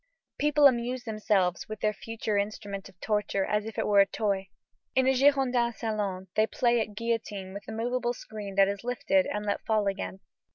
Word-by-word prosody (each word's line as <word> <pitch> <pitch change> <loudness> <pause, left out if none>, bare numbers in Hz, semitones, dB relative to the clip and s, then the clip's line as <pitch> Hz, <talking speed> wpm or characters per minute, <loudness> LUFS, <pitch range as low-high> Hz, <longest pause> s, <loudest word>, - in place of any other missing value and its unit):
People 295 0 +4
amuse 250 -1 +3
themselves 210 -6 0
with 215 -1 -5
their 215 0 +2
future 225 0 -4
instrument 200 -1 -3
of 180 - -21
torture 210 -2 0
as 210 +1 -1
if 225 - -8
it - - 0
were 205 -1 +4
a 195 - +6
toy. 195 -2 -1 0.5
In 260 - +4
a 265 - +4
Girondin 255 -3 +3
salon 205 -5 -3
they 215 +1 +3
play 240 0 +2
at 215 -1 -5
guillotine 215 -4 -3
with 200 - -8
a - - -6
moveable 240 +2 -1
screen 205 -4 -8
that 195 0 +6
is 200 +1 -3
lifted 235 -6 +1
and 210 0 -3
let 205 -1 -1
fall 215 -2 +1
again. 195 -1 -3
215 Hz, 195 wpm, -28 LUFS, 200-235 Hz, 0.5 s, a